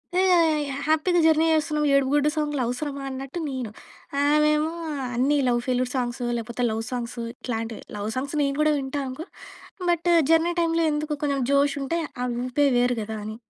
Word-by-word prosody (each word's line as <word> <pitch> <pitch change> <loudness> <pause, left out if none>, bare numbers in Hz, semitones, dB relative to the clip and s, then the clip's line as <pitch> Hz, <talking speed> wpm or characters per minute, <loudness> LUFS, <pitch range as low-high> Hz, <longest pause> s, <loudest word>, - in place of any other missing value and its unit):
యోహ్! 370 +1 +4
యోహ్! 350 -1 +6 0.3
యోహ్! 275 +1 -4
హ్యాపీ‌గా 320 +3 +3
జర్నీ 320 0 +4
జేస్తున్నాం. 305 -1 +1
ఏడుపు 275 -1 +3
గుడ్డు 295 0 +3
సాంగ్‌లు 295 -3 -1
అవసరమా 275 +3 -4
అన్నట్టు 270 +5 -6
నేను. 260 -5 -4 0.5
ఆమెమో 300 +1 +3 0.4
అన్ని 275 +5 +2
లవ్ 240 -1 +2
ఫెయిల్యూర్ 250 0 0
సాంగ్సు, 245 -1 -2
లేపోతే 235 +2 -4
లవ్ 220 +1 -2
సాంగ్సు 240 -1 -4
ఇట్లాంటివి. 225 -3 -5
లవ్ 205 +1 -3
సాంగ్స్ 275 +3 -3
నేను 275 -1 0
గూడా 305 0 +4
వింటా 275 +1 -3
అనుకో, 260 +6 -6 0.6
బట్టు 345 0 +2 0.2
జర్నీ 330 +1 +4
టైమ్‌లో 330 -1 +2
ఎందుకు? 300 0 -2
కొంచెం 280 -2 0
జోషుంటే 280 +2 +1 0.2
ఆ - - 0 0.2
ఊపే 285 +3 +2
వేరు 245 0 +2
గదా 220 +1 -5
అని. 215 +1 -6
280 Hz, 170 wpm, -25 LUFS, 250-305 Hz, 0.6 s, యోహ్